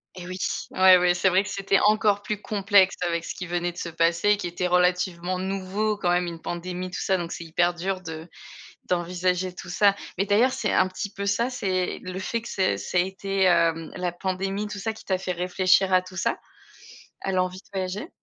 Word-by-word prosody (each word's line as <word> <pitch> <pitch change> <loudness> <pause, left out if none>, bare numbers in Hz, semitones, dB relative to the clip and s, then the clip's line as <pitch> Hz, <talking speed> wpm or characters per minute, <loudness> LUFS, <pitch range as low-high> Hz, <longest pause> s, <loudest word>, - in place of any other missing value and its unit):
Et 180 - -8
oui! 185 0 -5 0.3
Ouais, 185 -1 +7
ouais, 175 0 +3
c'est 185 +1 +2
vrai 185 +2 +3
que 205 - -7
c'était 195 0 +1
encore 210 -1 +3
plus 210 -1 -3
complexe 200 -2 +3
avec 170 -1 -1
ce - - -6
qui 180 - -5
venait 175 0 -2
de - - -18
se 170 - -4
passer, 170 +5 +2
qui 175 - -4
était 175 +1 -3
relativement 180 0 +1
nouveau 195 +3 -1
quand 180 - -1
même, 180 0 +2
une 170 -1 -7
pandémie 180 +1 -4
tout 180 - -5
ça, 190 -1 +1
donc 170 -1 -5
c'est - - -5
hyper 175 +2 +1
dur 185 +2 -3
de 160 -1 -7 0.6
d'envisager 180 +1 -1
tout 175 - -10
ça. 200 +2 +4 0.2
Mais 195 - +1
d'ailleurs, 220 +6 +3
c'est 215 - -1
un 185 - +4
petit 185 +2 -5
peu 200 - -4
ça, 230 +5 +1
c'est 190 -8 -2
le 185 +1 -6
fait 230 +4 -2
que 235 - -9
c'est 185 - +1
ça 180 - -3
été, 190 +1 -1
hem, 165 -3 +2
la 180 -1 -2
pandémie 195 +3 -3
tout 205 0 -6
ça 225 +3 -2
qui 220 - -14
t'a 190 -2 +1
fait 185 -1 -3
réfléchir 185 +2 +2
à 185 - +6
tout 185 0 -11
ça? - - 0 0.8
À 195 - -2
l'envie 185 0 0
de - - -22
voyager? 190 - -3
185 Hz, 215 wpm, -25 LUFS, 175-195 Hz, 0.8 s, Ouais